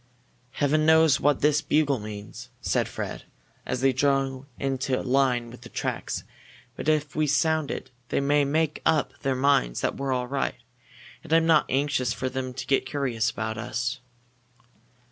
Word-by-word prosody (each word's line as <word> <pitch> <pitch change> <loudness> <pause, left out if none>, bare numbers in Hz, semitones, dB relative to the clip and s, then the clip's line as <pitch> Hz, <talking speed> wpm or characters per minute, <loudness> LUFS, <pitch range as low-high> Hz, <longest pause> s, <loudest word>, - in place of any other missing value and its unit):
"Heaven 150 +2 +2
knows 160 -2 +5
what 145 -1 +2
this 150 0 +3
bugle 145 -4 +2
means!" 105 -1 -8
said - - 0
Fred, - - -6 0.4
as 125 - -2
they 135 0 +4
drew 135 0 0
into 135 -1 -1
line 125 -3 +1
with 120 - -12
the 120 - -11
tracks. - - -3 0.5
"But - - -2
if 150 -3 0
we 155 0 +1
sound 160 +1 +2
it 130 - -5 0.2
they - - +1
may 145 +1 +3
make 155 +2 0
up 155 -5 +2
their 135 -2 0
minds 130 - +2
that - - -1
we're 135 -1 -2
all 125 -1 0
right 135 +2 -2 0.7
and - - -11
I'm 165 0 +5
not 160 -2 +4
anxious 135 -3 +1
for 130 - -3
them 130 0 -4
to - - -6
get 135 -1 +1
curious 125 -6 0
about 110 -1 -4
us." 120 +3 -3
135 Hz, 165 wpm, -26 LUFS, 125-145 Hz, 0.7 s, knows